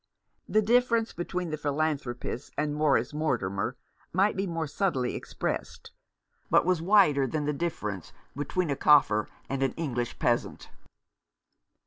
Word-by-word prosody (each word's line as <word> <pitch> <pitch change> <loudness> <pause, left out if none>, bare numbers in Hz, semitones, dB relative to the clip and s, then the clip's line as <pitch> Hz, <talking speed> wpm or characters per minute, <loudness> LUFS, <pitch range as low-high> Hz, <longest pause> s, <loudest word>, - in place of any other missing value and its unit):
The 215 0 +3
difference 235 0 +2
between 175 0 -3
the 155 - -2
philanthropist 145 -4 -2
and 150 0 0
Morris 150 -1 +2
Mortimer 120 -6 -1 0.3
might 195 +4 +2
be 195 +1 -1
more 165 -2 -2
subtly 140 -5 -1
expressed, - - -4 0.6
but - - +4
was 180 -2 +2
wider 165 -8 +4
than 150 +3 -2
the 150 - 0
difference 105 - -4 0.2
between 145 +4 -1
a - - +1
Kaffir 135 -8 +4 0.2
and 135 0 -3
an 135 -2 +1
English 125 -7 -3
peasant. 120 -1 -1
150 Hz, 130 wpm, -28 LUFS, 130-175 Hz, 0.6 s, but